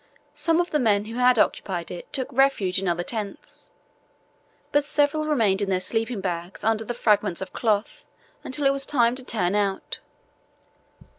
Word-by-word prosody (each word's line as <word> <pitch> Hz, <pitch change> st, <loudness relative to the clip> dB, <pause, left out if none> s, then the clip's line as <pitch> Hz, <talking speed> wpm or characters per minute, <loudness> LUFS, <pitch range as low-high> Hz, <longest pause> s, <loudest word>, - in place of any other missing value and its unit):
Some 330 Hz, 0 st, +1 dB
of 350 Hz, -, 0 dB
the 300 Hz, -, +2 dB
men 210 Hz, -5 st, +2 dB
who 225 Hz, +2 st, -7 dB
had 250 Hz, 0 st, +4 dB
occupied 180 Hz, -4 st, 0 dB
it 175 Hz, -, -8 dB
took 260 Hz, -2 st, -3 dB
refuge 245 Hz, -9 st, +2 dB
in 195 Hz, -, -2 dB
other 175 Hz, 0 st, 0 dB
tents, 210 Hz, -1 st, -5 dB, 1.0 s
but 290 Hz, 0 st, +3 dB
several 295 Hz, +1 st, +1 dB
remained 220 Hz, -10 st, +2 dB
in 200 Hz, -, -1 dB
their 185 Hz, -1 st, +1 dB
sleeping 225 Hz, +2 st, -2 dB
bags 175 Hz, 0 st, -4 dB
under 225 Hz, 0 st, +1 dB
the 240 Hz, +2 st, -5 dB
fragments 210 Hz, -6 st, +2 dB
of 190 Hz, -1 st, -6 dB
cloth 215 Hz, -2 st, -1 dB, 0.4 s
until 280 Hz, +2 st, -3 dB
it 275 Hz, -, +5 dB
was 275 Hz, 0 st, 0 dB
time 240 Hz, -4 st, +3 dB
to 260 Hz, +1 st, -6 dB
turn 205 Hz, -7 st, -1 dB
out. 200 Hz, -2 st, -1 dB
225 Hz, 170 wpm, -24 LUFS, 195-265 Hz, 1.0 s, it